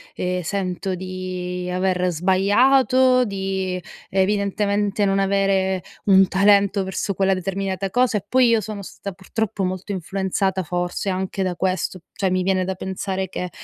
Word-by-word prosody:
ehm, 180 0 -1
sento 185 +1 -2
di 180 -1 -5
aver 180 0 +1
sbagliato, 250 - +4
di 190 -2 -3 0.3
evidentemente 200 +1 +1
non 195 0 +2
avere 195 -1 +1 0.2
un 195 -1 +6
talento 200 0 +3
verso 190 +1 -2
quella 195 +1 +2
determinata 195 +1 -2
cosa. 245 -2 +2
E 200 - -6
poi 255 +2 +4
io 230 -2 +3
sono 205 -1 -6
stata 200 +1 -7
purtroppo 200 +1 -3
molto 185 +2 -3
influenzata 190 +1 -1
forse 175 +3 -2
anche 190 +1 -2
da 180 -1 -1
questo. 185 0 -1
Cioè, 190 -2 0
mi 185 0 +1
viene 185 -1 +1
da 190 0 -3
pensare 190 0 -3
che 180 -1 -4
190 Hz, 145 wpm, -22 LUFS, 185-200 Hz, 0.3 s, un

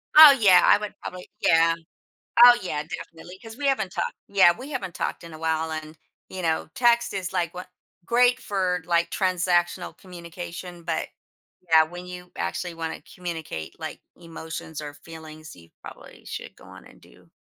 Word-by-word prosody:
Oh 305 -2 +12
yeah, 185 -4 +7
I - - +6
would 210 -1 -6
probably 180 0 -8
yeah, 165 0 +4 0.7
oh 245 0 +9
yeah, 150 -5 -3
definitely, 165 +3 -9
'cause 225 +2 -10
we 285 -1 -1
haven't 215 -9 0
talked - - -2
yeah 190 -3 +5
we 270 +4 -9
haven't 190 -10 -5
talked - - -3
in 165 -1 -10
a 155 - -10
while 160 0 -1
and, 155 0 -6 0.3
you 190 -1 -6
know, 160 -2 -1
text 235 -2 +3
is, 190 -2 -4
like, 170 -1 -1
wha 180 0 -6 0.4
great 245 +1 +3
for, 185 -4 -1
like, 170 -1 +1
transactional 180 -1 0
communication, 175 -1 -9
but, - - -2 0.6
yeah, 160 -1 +7
when 175 +3 -9
you 180 0 -10
actually 125 - -3
wanna 165 -1 -5
communicate, 165 - -6
like, - - -7 0.2
emotions 160 -2 -8
or 145 -1 -7
feelings, 155 +1 -12
you 85 -1 -17
probably - - -13
should - - -7
go - - -18
on - - -14
and - - -18
do - - -21
175 Hz, 170 wpm, -25 LUFS, 160-190 Hz, 0.7 s, Oh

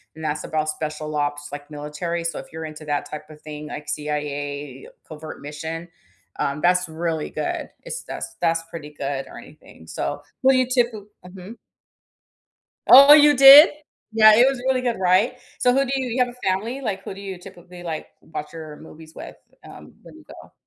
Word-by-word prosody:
and 160 - -10
that's 155 0 -3
about 155 0 -2
special 155 0 -5
ops 145 0 -2
like 145 +1 -9
military, 150 +4 -5
so 170 - -3
if - - -8
you're 160 0 -6
into 155 0 -10
that 145 -1 -3
type 150 0 -8
of 150 -1 -14
thing, 150 0 -8
like 150 - -8
CIA 145 -2 -5 0.2
covert 155 0 -10
mission, 160 +3 -7 0.5
um, 140 +2 -2
that's 180 +1 +2
really 160 -1 -4
good. - - -4
It's - - -6
that's - - -7
that's 165 -1 +1
pretty 150 -3 -9
good 140 -2 -4
or - - -12
anything. 80 - -16
So, - - -4 0.2
who 265 - +6
do 265 - +3
you 255 -1 +2
typi 240 -5 0 0.2
Mhm. 185 +4 -11 1.3
Oh, 280 +3 +10
you 295 -1 +7
did? 275 +4 +10 0.4
Yeah, 215 -1 +7
it 240 +3 +6
was 270 -2 -1
really 260 -1 +1
good, 240 -2 -1
right? 190 +7 +2 0.2
So 250 - +3
who 275 +1 +2
do 260 - -5
you 260 -2 -2
you 240 +2 -3
have - - -4
a 250 - -7
family, 220 +8 -2
like, 195 -6 -4
who - - -7
do 195 - -11
you 195 -2 -7
typically, 180 -1 -13
like, 165 -3 -5
watch 150 -2 -8
your 155 -2 -9
movies 160 0 -14
with, - - -10 0.3
um, - - -14
when - - -15
you - - -17
go? - - -14
165 Hz, 195 wpm, -22 LUFS, 150-225 Hz, 1.3 s, Oh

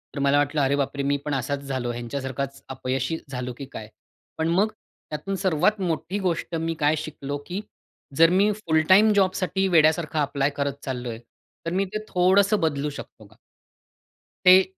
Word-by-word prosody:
तर - - -3
मला 140 +1 +3
वाटलं, 145 +1 +1
"अरे 135 +1 +2
बापरे! 140 0 -1
मी 140 +1 +1
पण 150 - -2
असाच 140 +1 -1
झालो, 130 -3 -2
ह्यांच्यासारखाच 135 +3 -4
अपयशी 130 +3 -2
झालो 125 -1 -4
की 140 - -6
काय?" 110 -1 -7 0.5
पण, 160 - 0
मग 195 +6 +2
त्यातून 195 +2 -7
सर्वात 190 +2 +1
मोठी 170 +2 -2
गोष्ट 175 -2 -2
मी 165 0 -1
काय 150 +1 +3
शिकलो? 145 -2 -5
की 185 +4 -4 0.5
जर 165 +3 +6
मी 195 +4 +3
फुल 165 -7 +1
टाईम 210 +3 +7
जॉबसाठी 190 0 +1
वेड्यासारखा 160 -2 +3
ॲप्लाय 140 -1 +1
करत 140 -1 0
चाललो 125 -3 -4
आहे, 115 -1 -6 0.5
तर 165 - -2
मी 190 +2 +1
ते - - 0
थोडंसं 195 +3 +4
बदलू 150 -2 0
शकतो 125 -6 -10
का? 105 +2 -20 1.1
ते 185 +1 +9
150 Hz, 170 wpm, -24 LUFS, 140-185 Hz, 1.1 s, ते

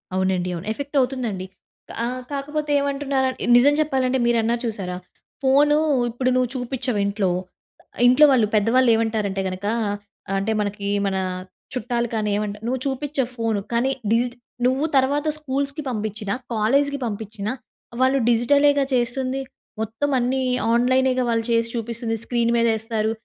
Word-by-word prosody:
అవునండి 185 -1 0
అవును. 170 - -7
ఎఫెక్ట్ 285 +3 -4
అవుతుందండి. 240 -8 -2 0.6
ఆ! - - +1 0.3
కాకపోతే 295 +2 -3
ఏమంటున్న 280 0 -2 0.4
నిజం 285 +4 +5
చెప్పాలంటే 265 -3 +1
మీరు 240 -1 +3
అన్నారు 235 +1 0
చూశారా. 190 -5 -3 0.5
ఫోను 290 +3 +4 0.3
ఇప్పుడు 255 +2 -1
నువ్వు 250 -2 +2
చూపించవ్ 250 -2 -2
ఇంట్లో. 200 -2 0 0.7
ఆహ్, - - -4
ఇంట్లో 255 +5 +7
వాళ్ళు, 235 -5 +4
పెద్దవాళ్ళు 240 +4 +3
ఏమంటారంటే 215 -4 -1
గనుక 185 +2 -5 0.7
అంటే 205 +3 -1
మనకి 205 -1 -3 0.2
మన 195 - 0 0.6
చుట్టాలు 240 -1 -1
కానీ 215 -2 0
ఏమంటా 210 0 -3
నువ్వు 255 +2 0
చూపించవ్ 270 -2 -2
ఫోన్ 225 -2 0 0.2
కానీ 240 +3 +2 0.2
డిజి 235 +2 +3 0.4
నువ్వు 260 +4 +2
తర్వాత 285 +3 +2
స్కూల్స్‌కి 280 0 -2
పంపించినా, 215 -3 -3 0.2
కాలేజ్‌కి 280 +6 +2
పంపించినా 215 -1 -4 0.5
వాళ్ళు 265 +1 +4
డిజిటలె‌గా 280 +4 +4
చేస్తుంది. 255 +2 0 0.4
మొత్తం 225 +7 -2
అన్నీ 260 +2 0 0.3
ఆన్‍లైనె‌గా 255 +1 +3
వాళ్ళు 230 -1 +1
చేసి 230 0 +2
చూపిస్తుంది. 230 0 -2
స్క్రీన్ 235 -1 0
మీదేస్తారు. 220 -1 +1
240 Hz, 130 wpm, -22 LUFS, 220-265 Hz, 0.7 s, ఇంట్లో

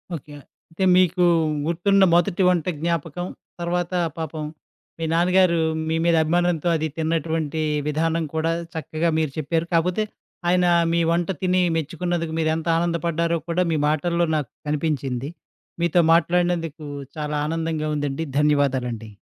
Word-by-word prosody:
Okay. 145 -1 -10 0.4
అంటే 170 +4 -3
మీకు 180 0 +3 0.4
గుర్తున్న 195 +4 +3
మొదటి 175 +2 +2
వంట 175 -3 +1
జ్ఞాపకం 170 0 -2 0.4
తర్వాత, 175 +1 -1 0.2
పాపం 160 -1 -4 0.6
మీ 165 - -2
నాన్నగారు 175 0 +3 0.3
మీ 160 - +1
మీద 170 -1 +4
అభిమానంతో 175 0 +1
అది 160 0 0
తిన్నటువంటి 160 -1 -1 0.3
విధానం 160 +2 0
కూడా 160 +1 +1 0.2
చక్కగా 160 +1 -1
మీరు 155 -3 0
చెప్పారు. 160 +2 -1
కాకపోతే 180 +5 +2 0.5
ఆయన 180 0 +3 0.3
మీ 170 - +2
వంట 170 +1 0
తిని 185 0 +2 0.2
మెచ్చుకున్నందుకు 165 +1 -2
మీరెంత 160 +1 0
ఆనందపడ్డారో 170 0 0
కూడా 175 +2 +2
మీ 160 - +1
మాటల్లో 170 +3 +1
నాకు 145 -6 -2 0.2
కనిపించింది. 140 -4 -2 0.5
మీతో 170 +1 +3
మాట్లాడినందుకు 170 -2 +1 0.3
చాలా 150 0 -3
ఆనందంగా 160 -1 -2
ఉందండి. 145 +2 -2
ధన్యవాదాలండి 130 -7 0
165 Hz, 125 wpm, -23 LUFS, 155-175 Hz, 0.6 s, మీద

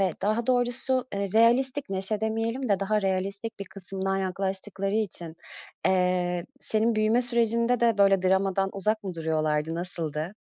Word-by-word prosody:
ve 190 -2 +2
daha 215 +4 0
doğrusu, 250 +1 +1
eee, 200 0 -2
realistlik 250 +2 +3
neşe 195 +2 +2
demeyelim 225 +3 -2
de 200 -1 +1
daha 210 +1 0
realistlik 195 +3 -2
bir 200 - -5
kısımdan 195 0 -4
yaklaştıkları 195 +1 -2
için, 175 -6 -2 0.5
eee, 180 -1 +1
senin 225 +1 0
büyüme 215 +3 +2
sürecinde 235 0 +2
de 230 -3 +2
böyle 195 -2 +4
dramadan 190 +1 +1
uzak 215 +2 0
mı 185 - -4
duruyorlardı, 155 -1 -1
nasıldı? 165 0 -4
195 Hz, 145 wpm, -26 LUFS, 185-225 Hz, 0.5 s, böyle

